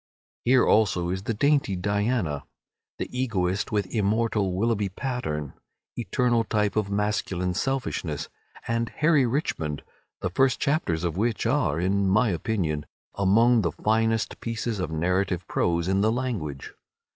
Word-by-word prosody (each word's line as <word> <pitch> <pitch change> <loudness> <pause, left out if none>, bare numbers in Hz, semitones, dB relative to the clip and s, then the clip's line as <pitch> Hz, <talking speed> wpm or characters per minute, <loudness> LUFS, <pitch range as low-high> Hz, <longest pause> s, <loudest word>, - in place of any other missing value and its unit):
Here 125 +1 +5
also 90 -5 +3
is 95 +1 -2
the 115 - -2
dainty 140 -4 +2
"Diana," 100 - -1 0.5
the - - -3
egoist 100 -7 -1
with 105 -2 +1
immortal 105 -2 +1
Willoughby 105 0 +1
Pattern, 90 - -3 0.4
eternal 120 -1 +1
type 105 -1 0
of 105 -2 0
masculine 100 -3 -1
selfishness, 90 - -2 0.4
and 115 0 0
"Harry 150 -4 +3
Richmond," 80 - -2 0.4
the - - -2
first 135 -2 +2
chapters 115 - 0
of 85 -1 -2
which 115 +2 0
are, 115 - +1
in 95 +2 +1
my 110 +4 +3
opinion, 85 -5 -1 0.3
among 115 +5 +4
the 85 -4 0
finest 110 +4 0
pieces 115 -2 -3
of 90 - -2
narrative 90 +3 0
prose 85 0 0
in 95 +1 +2
the 110 +2 +3
language. 110 - -3
105 Hz, 135 wpm, -26 LUFS, 90-115 Hz, 0.5 s, Here